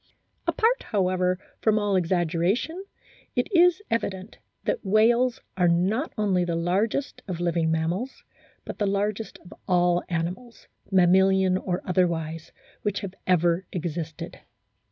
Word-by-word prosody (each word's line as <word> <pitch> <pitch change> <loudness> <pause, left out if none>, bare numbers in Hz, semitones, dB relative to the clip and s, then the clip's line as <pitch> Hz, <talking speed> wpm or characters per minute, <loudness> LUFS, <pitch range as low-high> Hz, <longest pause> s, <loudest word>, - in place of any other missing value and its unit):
Apart, 470 +3 +2
however, 185 -3 +1 0.2
from 215 -1 +3
all 205 -2 +1
exaggeration, 180 - 0 0.5
it - - +1
is 360 +2 +4
evident 200 -3 -3 0.2
that - - -1
whales 230 +5 +3 0.2
are 180 -2 +3
not 190 - +1
only 195 -4 +2
the 170 -1 -1
largest 195 +11 -1
of 180 -3 -4
living 170 -2 +1
mammals, 170 +10 -2 0.4
but - - -7
the 205 - +1
largest 205 +2 -2
of 180 - -12
all 175 -1 +3
animals, 180 +8 -4 0.2
mamma 185 0 +5
lian 190 -1 +3
or 180 -1 -2
otherwise, 165 -3 -1 0.3
which 205 -1 -2
have 195 -3 -6
ever 175 0 +2
existed. 165 -2 -5
185 Hz, 130 wpm, -25 LUFS, 175-215 Hz, 0.5 s, mamma